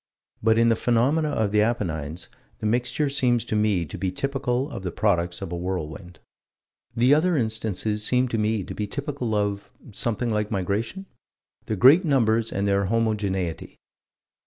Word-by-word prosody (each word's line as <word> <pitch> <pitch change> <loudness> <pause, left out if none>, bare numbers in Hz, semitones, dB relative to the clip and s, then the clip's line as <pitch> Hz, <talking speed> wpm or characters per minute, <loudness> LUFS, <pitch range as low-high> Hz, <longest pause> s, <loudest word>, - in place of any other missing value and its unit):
But 110 +1 +3
in 115 0 +4
the 115 - +4
phenomenon 135 +7 +1
of 110 -2 +1
the 105 0 +3
Apennines, 85 -8 -2 0.3
the - - -6
mixture 125 +6 0
seems 125 -4 +1
to - - -2
me 105 -5 +1
to - - -8
be 95 -2 -1
typical 135 +3 -1
of 100 - -6
the 90 -2 -4
products 85 +1 0
of - - -6
a - - -2
whirlwind. 90 0 -5 0.8
The 125 +4 +4
other 165 +2 +3
instances 110 -2 -2
seem 125 +3 +2
to 115 - -1
me 105 -1 0
to - - -7
be 105 - -3
typical 135 -2 -3
of 100 -1 -1 0.2
something 115 +2 -1
like 105 -1 -1
migration? 105 - -2 0.6
Their 110 - -2
great 140 - +7
numbers 115 -7 +2
and 100 +1 -1
their 100 0 +2
homogeneity. 100 -5 -1
110 Hz, 165 wpm, -24 LUFS, 100-125 Hz, 0.8 s, great